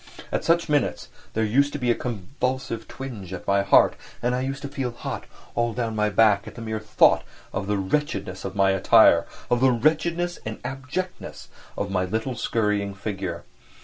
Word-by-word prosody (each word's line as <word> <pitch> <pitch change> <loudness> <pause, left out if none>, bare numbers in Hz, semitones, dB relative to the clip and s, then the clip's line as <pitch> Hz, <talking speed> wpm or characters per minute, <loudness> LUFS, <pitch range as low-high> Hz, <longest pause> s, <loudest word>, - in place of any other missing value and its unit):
At - - -1
such 170 0 +2
minutes 145 -4 0 0.3
there 110 - +2
used 140 +7 +2
to - - -2
be 125 -3 +1
a - - +5
convulsive 125 +1 -3
twinge 110 -9 -7
at 90 - -7
my 100 0 +3
heart, 100 - +5 0.2
and 120 +1 0
I 125 - 0
used 135 +2 -4
to - - -3
feel 135 -2 -3
hot 120 - -6 0.3
all 120 -1 0
down 115 -2 -2
my 105 0 +2
back 105 -1 +4
at - - -9
the 115 - -8
mere 110 -1 -3
thought 105 0 +4 0.3
of 95 0 -3
the 105 0 +1
wretchedness 100 -3 -2
of 95 - -5
my 100 -1 +4
attire, 95 - +5 0.2
of 120 - +4
the 130 +1 +5
wretchedness 165 +7 +1
and 110 0 -5
abjectness 135 +8 -5 0.3
of 100 -1 -2
my 95 -1 +1
little 110 +7 -2
scurrying 105 -3 0
figure. 95 -4 -4
115 Hz, 185 wpm, -25 LUFS, 100-135 Hz, 0.3 s, a